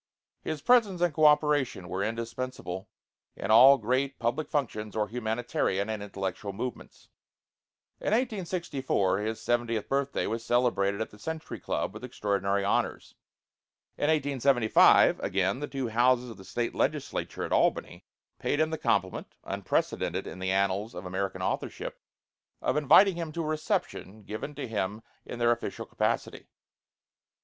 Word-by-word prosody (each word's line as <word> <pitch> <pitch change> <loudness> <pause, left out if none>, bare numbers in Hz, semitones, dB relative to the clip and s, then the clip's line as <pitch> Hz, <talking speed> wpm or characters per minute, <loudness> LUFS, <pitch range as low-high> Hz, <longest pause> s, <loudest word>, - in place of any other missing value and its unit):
His 155 -2 -4
presence 220 -6 +4
and 175 -3 +2
co 155 0 +3
operation 150 - +3
were 95 +3 -2
indispensable 115 -4 -4 0.5
in - - -3
all 130 +5 +9
great 130 +4 -1
public 120 +7 -1
functions 110 -7 -2
or 105 -1 0
humanitarian 110 -3 -1
and 110 -2 -4
intellectual 100 0 -4
movements. 120 +4 -7 0.9
In - - -11
1864 175 - 0
his 110 +1 -3
seventieth 120 -3 -1
birthday 140 0 0
was 115 +2 -3
celebrated 115 -5 +1
at 110 - -3
the 105 - -15
Century 160 +7 -5
Club - - -2
with - - -10
extraordinary 100 -1 -1
honors. 100 - -1 0.8
In - - -1
1875, 140 -6 +4
again, 95 +5 0
the 145 - -3
two 135 -4 -3
houses 125 +2 +2
of 110 - -11
the 95 - -13
State 120 +5 -2
Legislature - - -2
at - - -5
Albany - - +1 0.4
paid 145 - 0
him 155 0 +2
the 160 - -3
compliment, 95 -3 -1
unprecedented - - -1
in - - -8
the 95 0 -2
annals 100 +3 0
of 90 - -7
American 95 +1 -3
authorship, - - -3 0.6
of - - 0
inviting 170 +6 +6
him 165 -2 -4
to 170 - -2
a - - -4
reception 130 -8 -3
given 110 +9 -6
to 140 -2 -5
him 105 0 -3 0.2
in - - -6
their 120 0 +3
official 120 - -3
capacity. - - -2
120 Hz, 145 wpm, -28 LUFS, 100-145 Hz, 0.9 s, all